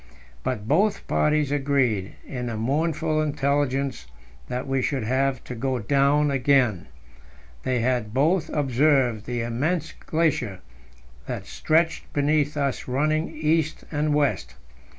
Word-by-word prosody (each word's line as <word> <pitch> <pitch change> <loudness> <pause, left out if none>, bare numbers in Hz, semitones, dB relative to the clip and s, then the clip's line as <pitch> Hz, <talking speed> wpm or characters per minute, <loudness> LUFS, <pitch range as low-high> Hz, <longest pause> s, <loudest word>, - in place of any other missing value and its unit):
But 110 - -3
both 195 - +2
parties 150 -2 +1
agreed 135 -8 +1
in 125 -3 -5
the 115 -2 -3
mournful 155 +5 0
intelligence 140 - 0 0.4
that 125 +2 -4
we 135 -1 0
should 130 -1 -1
have 130 +2 0
to - - -7
go 130 +2 -1
down 140 +5 +2
again. 130 -7 +2 0.7
They 125 -2 0
had 120 -3 0
both 155 - +2
observed 135 -5 +2
the 120 -1 -2
immense 150 +8 -1
glacier 140 - -1 0.7
that - - -4
stretched 160 +1 0
beneath 145 0 +1
us 140 -2 -1
running 155 +5 0
east 155 0 0
and 150 -1 +1
west. 145 -2 0
140 Hz, 125 wpm, -24 LUFS, 125-155 Hz, 0.7 s, both